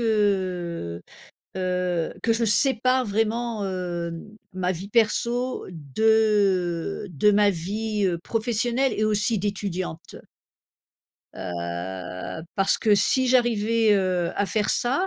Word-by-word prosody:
heu, 185 - -1 0.6
heu, 180 -2 -1
que 230 - +2
je 230 +1 +1
sépare 255 +3 +3
vraiment, 225 +1 -1
hem, 175 +1 -5 0.2
ma 185 0 -1
vie 190 +2 -5
perso 235 +3 +1
de 185 - +1
de 175 +7 +3
ma 205 0 +4
vie, 205 +4 -2
heu, 175 -2 0
professionnelle 235 +6 0
et - - -1
aussi 215 +1 +1
d'étudiante. 185 -4 -4 1.2
Heu, 90 - -5
parce 195 0 +2
que 215 -2 +4
si 260 +6 +3
j'arrivais, 230 -3 +3
heu, 185 -3 0
à 205 - +2
faire 210 0 -1
ça 270 +10 +1
205 Hz, 110 wpm, -24 LUFS, 175-225 Hz, 1.2 s, ma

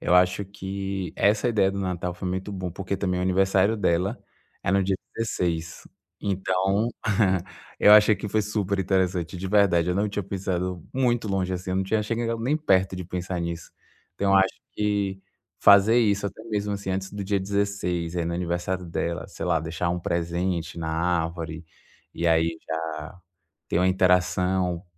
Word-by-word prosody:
eu 90 - +2
acho 90 +2 +4
que 95 -1 -5
essa 105 +4 +3
ideia 105 -4 +3
do 100 - -5
Natal 90 -2 -2
foi 90 +1 -4
muito 95 +2 -3
bom, 95 -2 -4
porque 95 +2 -3
também 90 -2 -1
o - - 0
aniversário 95 +3 +3
dela 95 +3 +1 0.4
é - - 0
no 100 0 +3
dia 95 0 0 0.2
16. 85 -7 -2 0.4
Então, 95 +2 +1 0.9
eu 105 - +7
achei 105 0 +8
que 105 - -6
foi 110 +2 +1
superinteressante, 95 -4 0
de 95 - -4
verdade. 95 -5 +3
Eu 90 - +1
não 100 +3 +1
tinha 105 0 -3
pensado 90 -2 -3
muito 120 -3 +1
longe 95 -2 0
assim, 90 0 -4
eu 95 - 0
não 95 - +2
tinha 105 +2 +1
chegado 115 +1 -2
nem 135 +6 +1
perto 95 -11 +2
de 90 - -5
pensar 90 0 -4
nisso. 85 0 -5 0.4
Então 100 +2 +1
eu - - +7
acho 95 0 +3 0.2
que 100 -2 -1 0.4
fazer 100 +4 +6
isso, 105 -3 +2
até 100 - -8
mesmo 105 -2 -2
assim, 100 -1 -4
antes 95 0 -2
do 100 -1 -5
dia 100 0 +1
16, 95 -4 -1
aí 85 - 0
no 85 - -2
aniversário 90 +1 -2
dela, 85 0 -3
sei 95 - -6
lá, 85 -2 +3
deixar 85 +1 -2
um 90 - -1
presente 85 0 -2
na 80 -1 -3
árvore, 85 -1 -2 0.5
e 85 - -1
aí 80 0 +2
já 80 +1 -5 0.5
ter - - +1
uma 90 - +3
interação 90 -1 +2
95 Hz, 175 wpm, -25 LUFS, 90-100 Hz, 0.9 s, achei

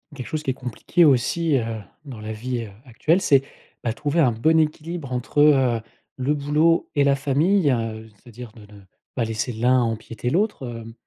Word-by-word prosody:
Quelque 125 - -7
chose 155 -1 -4
qui 135 - 0
est - - -3
compliqué 130 +7 +1
aussi, 150 +3 +2
heu, 115 -2 -3 0.2
dans 125 -6 -9
la 110 +1 -5
vie 120 +3 -4
heu, - - -10 0.2
actuelle, 155 +9 +1
c'est, 140 -7 +4 0.4
ben 115 - -1
trouver 145 +7 -1
un 135 -7 +4
bon 160 +9 +2
équilibre 155 -1 -2
entre, 125 +3 -2
heu, 135 -6 +4 0.4
le 135 +3 0
boulot 150 +4 +2
et 145 - +4
la 140 0 +3
famille, 145 +5 +2
heu. 110 -2 -3
C'est-à-dire 120 -1 -11
de 110 - -16
ne 100 -1 -14 0.3
pas 125 - 0
laisser 110 +2 -3
l'un 125 +3 +3
empiéter 115 +1 -3
l'autre, 185 - -1
hem. 115 -1 -8
130 Hz, 190 wpm, -23 LUFS, 115-150 Hz, 0.4 s, c'est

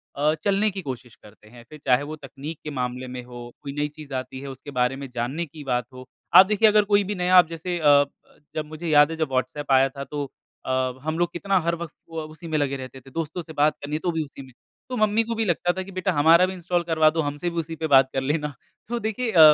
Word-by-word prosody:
अ, 150 +2 +2
चलने 200 +1 +2
की 190 0 -5
कोशिश 125 -5 -7
करते 105 0 -18
हैं। 120 0 -14
फिर 155 - -11
चाहे 125 +2 +4
वो 155 +2 -6
तकनीक 145 +2 -8
के 150 - -5
मामले 125 -1 -3
में 125 0 -6
हो, 120 -1 -10
कोई 140 -1 -6
नई 145 0 -1
चीज़ 150 -3 -10
आती 130 0 -4
है 140 - -7
उसके 135 +2 -9
बारे 125 +1 +2
में 135 - -7
जानने 130 +8 -2
की 150 0 -11
बात 125 -3 0
हो। 130 0 -10 0.3
आप 190 - +11
देखिए 210 +2 +4
अगर 210 0 +5
कोई 205 0 +3
भी 205 +2 -3
नया 180 0 +4
अब 175 - +5
जैसे 170 +2 -4
अ - - -7
अ, 145 0 +7 0.5
जब 155 - -2
मुझे 155 +2 -7
याद 150 0 +6
है 165 - -4
जब 160 -3 -1
वहाट्सएप 140 +2 -2
आया 135 0 +6
था 140 +1 -7
तो 145 +1 -4 0.4
अ, - - -5 0.3
हम 155 +1 -2
लोग 175 0 +1
कितना 195 +2 +1
हर 170 +1 0
वक्त 170 -2 -7 0.2
व 160 - -2
उसी 160 +2 -10
में 155 -1 0
लगे 140 -2 0
रहते 130 0 -9
थे 135 +1 -16
दोस्तों 165 +3 -3
से 160 -1 -11
बात 150 0 +3
करनी 145 +1 -3
है 155 - -1
तो 175 - -1
भी 160 -1 -1
उसी 140 -1 -12
में। 130 - -16 0.4
तो 255 - -3
मम्मी 215 +1 +3
को 230 0 -3
भी 225 - 0
लगता 175 -1 +1
था 190 - -1
कि 195 - -11
बेटा 185 -1 -1
हमारा 165 +4 +6
भी 185 - -4
इंस्टॉल 175 -1 -1
करवा 160 -2 +4
दो, 160 +1 0
हमसे 145 +4 -2
भी 170 - -9
उसी 165 0 -4
पे 160 0 -3
बात 135 -2 +6
कर 135 - 0
लेना। 150 +2 -1 0.4
तो 240 0 -1
देखिए 220 +2 -2
अ, 170 - +3
155 Hz, 275 wpm, -24 LUFS, 135-175 Hz, 0.5 s, आप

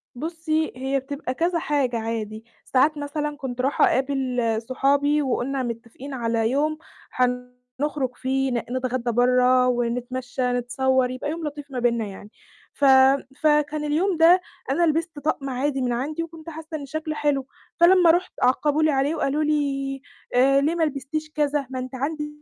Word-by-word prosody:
بُصّي، 315 +2 -2
هي 265 +2 -1
بتبقى 270 0 -5
كذا 335 +4 0
حاجة 275 -6 0
عادي، 220 -1 -4 0.2
ساعات 290 +4 +2
مثلًا 295 0 -3
كنت 255 -3 -4
راحة 270 +2 +3
أقابل 265 -1 0 0.3
صحابي 285 +3 +2
وقُلنا 265 0 -1
مِتفقين 240 +4 -7
على 230 -2 0
يوم 305 +3 +1 0.3
حنخرُج 250 +2 -2
فيه 265 +1 -1
ن 245 - 0 0.2
نتغدّى 250 -1 -1
برّا 250 +1 +4
ونتمشى، 250 +1 -2
نتصوّر 255 +1 +1
يبقى 255 +3 -4
يوم 330 +1 -5
لطيف 290 -1 -8
ما 255 - -3
بيننا 235 -2 +1
يعني، 205 +1 -10 0.4
ف 285 - 0 0.6
فكان 300 0 +2
اليوم 325 +5 +1
ده 345 +3 +6 0.3
أنا 345 - +2
لبِست 325 -1 0
طَقم 285 -2 -2
عادي 270 +1 -1
من 245 - 0
عندي 295 +7 -2
وكنت 330 0 -10
حاسّة 315 0 -7
إن 285 - -7
شكله 310 +2 -4
حلو، 280 -3 0 0.3
فلمّا 350 0 +7
رُحت 355 +2 0
عقَّبوه 295 +4 +2
لي 310 - +4
عليه 275 +3 +1
وقالوا 295 0 0
لي 275 -3 -1 0.3
آآ، 275 +2 +5
ليه 310 +4 +1
ما 335 - +1
لبِستيش 305 +1 -3
كذا، 295 -2 0
ما 260 -1 -4
أنتِ 255 +1 -6
عندِك 300 +3 -2
275 Hz, 160 wpm, -24 LUFS, 250-305 Hz, 0.6 s, فلمّا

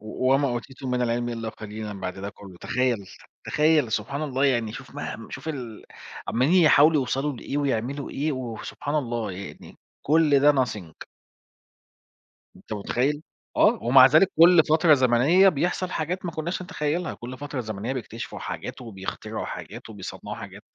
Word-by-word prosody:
"وما 130 +6 +1
أوتيتم 130 +2 -5
من 125 0 0
العلم 120 0 0
إلّا 115 -1 -4
قليلًا" 105 -2 -7
بَعد 90 - -4
ده 100 +1 -5
كلّه 95 -3 -13
تخيّل 125 -5 0
س - - -14 0.3
تخيّل 150 -6 +2
سبحان 140 +8 -2
الله 135 -2 0
يعني 120 -5 +1
شوف 130 +2 -10
مه 115 - -6
شوف 135 +3 -7
ال 125 -8 -6 0.4
عمّالين 155 +10 +3
يحاولوا 155 +1 +6
يوصَلوا 135 +3 -1
لإيه 140 +4 -4
ويعملوا 140 0 -2
إيه 150 +3 -1
وسبحان 130 +3 -5
الله 120 -8 -1
يعني 95 +2 -10 0.3
كل 150 -2 +4
ده 145 +1 +6
nothing 110 - -3 1.5
أنت - - -9
متخيّل، 130 +8 -1 0.4
آه، - - +4
ومع 130 +2 +7
ذلك 155 +8 +5
كلّ 170 0 +8
فترة 160 0 +5
زمنيّة 135 +9 +5
بيحصَل 180 +3 -1
حاجات 180 +4 -3
ما 175 - -2
كنّاش 165 +4 -3
نتخيّلها، 175 -2 -2
كلّ 125 +2 -8
فترة 145 -2 -4
زمنيّة 110 +2 -4
بيكتشفوا 115 -2 -6
حاجات - - -6
وبيخترعوا 95 -5 -6
حاجات - - -8
وبيصنّعوا 100 -4 -7
حاجات، - - -10
130 Hz, 155 wpm, -25 LUFS, 115-150 Hz, 1.5 s, كلّ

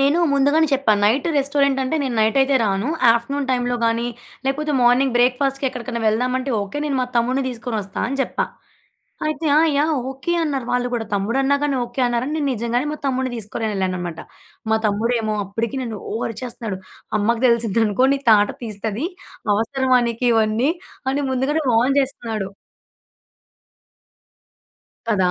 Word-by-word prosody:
నేను 280 +5 +3
ముందుగానే 285 +3 +3
చెప్పా 270 -5 +3
నైట్ 245 +9 +2
రెస్టారెంట్ 280 -1 +2
అంటే 265 +5 -1
నేను 255 -3 -2
నైటయితే 265 +5 +3
రాను 195 +4 0 0.2
ఆఫ్టర్నూన్ 265 +4 -2
టైంలో 245 -1 0
గాని 230 +1 +1 0.4
లేపోతే 300 +2 0
మార్నింగ్ 245 +1 +4
బ్రేక్‌ఫాస్ట్‌కి 265 +2 +2
ఎక్కడికనా 240 -1 -5
వెళ్దామంటే 255 +4 0
ఓకే 200 +9 -5
నేను 280 -3 -1
మా 250 - 0
తమ్ముడిని 255 +3 +1
తీసుకొనొస్తా 225 -5 -5
అని 275 +1 -3
జెప్పా. - - 0 0.8
అయితే 310 +1 -2
"ఆ! - - +7 0.2
యాహ్! 310 +2 +2 0.2
ఓకే" 270 +6 -3
అన్నారు 275 -5 -2
వాళ్ళు 245 0 +1
గూడా. 230 -2 -1
తమ్ముడన్నా 265 +8 +1
గానీ 285 -2 +1
ఓకే 240 +2 -5
అన్నారని 240 +5 -1
నేను 290 -3 0
నిజంగానే 240 +4 -1
మా - - -4
తమ్ముడిని 260 -1 -1
తీసుకొని 220 +1 -4
ఎళ్ళాననమాట. 180 -3 -2 0.5
మా 220 - +4
తమ్ముడేమో 220 +1 0
అప్పటికి 225 +6 -3
నన్ను 225 -4 -5
ఓ - - -3
అరిచేస్తున్నాడు 230 -4 -5 0.4
"అమ్మకి 230 +4 +1
తెలిసిద్దనుకో 230 0 +2
నీ - - -1
తాట 205 -1 +6 0.2
తీస్తది. 220 - -3 0.5
అవసరమా 255 +3 +2
నీకివన్నీ" 230 +2 +2 0.4
అని 285 +1 -1
ముందుగానే 280 +5 0
వార్న్ 250 +5 +3
జేస్తున్నాడు. 225 -7 -3 2.6
కదా! 190 -5 +2
245 Hz, 140 wpm, -21 LUFS, 225-275 Hz, 2.6 s, ఆ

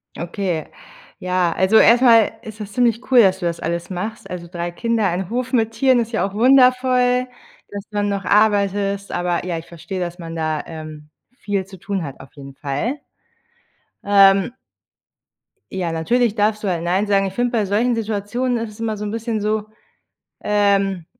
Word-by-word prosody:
Okay, 175 -2 -3 0.5
ja, 180 -1 0
also 190 +4 +3
erst 235 +2 +6
mal 230 -3 +6
ist 220 -1 -10
das 210 -1 -7
ziemlich 245 0 0
cool, 245 -2 +8
dass 190 -2 +3
du 175 - -4
das 170 0 -2
alles 170 +2 -3
machst. 200 +5 -5
Also 175 -1 -6
3 175 0 -5
Kinder 230 +2 -1
ein 180 +2 -2
Hof 250 +2 -3
mit 225 -2 +2
Tieren 255 +2 +3
ist 235 0 -2
ja 220 - 0
auch 195 - -11
wundervoll. 250 +1 +4 0.4
Dass 200 -1 -7
du 210 - -6
dann 205 0 +1
noch 200 -1 -2
arbeitest 200 -1 +1
aber, 175 -1 -1
ja, 170 -2 -2
ich 165 - -8
verstehe, 180 +3 -7
dass 175 0 -4
man 165 -1 -7
da, 155 -2 -2
ähm, 155 -2 -9 0.3
viel 200 -5 -2
zu 190 -1 -13
tun 195 +1 -3
hat 140 -3 -8
auf 135 - -13
jeden 135 -1 -11
Fall. 155 - -3 1.1
Ähm 195 +1 +5 1.2
ja, 180 -3 -2
natürlich 225 +8 +1
darfst 210 0 0
du - - -1
da 175 -3 0
nein 185 +5 0
sagen. 195 -1 +2
Ich 190 - -4
finde, 245 +2 0
bei 220 -4 +1
solchen 225 +5 +1
Situationen 225 +3 -2
ist 225 -1 -4
es 220 - -17
immer 220 -1 -2
so 210 - -6
'n 205 - -4
bisschen 225 -1 -3
so, 215 0 -1 0.8
ähm 200 -4 +1
200 Hz, 185 wpm, -20 LUFS, 175-225 Hz, 1.2 s, cool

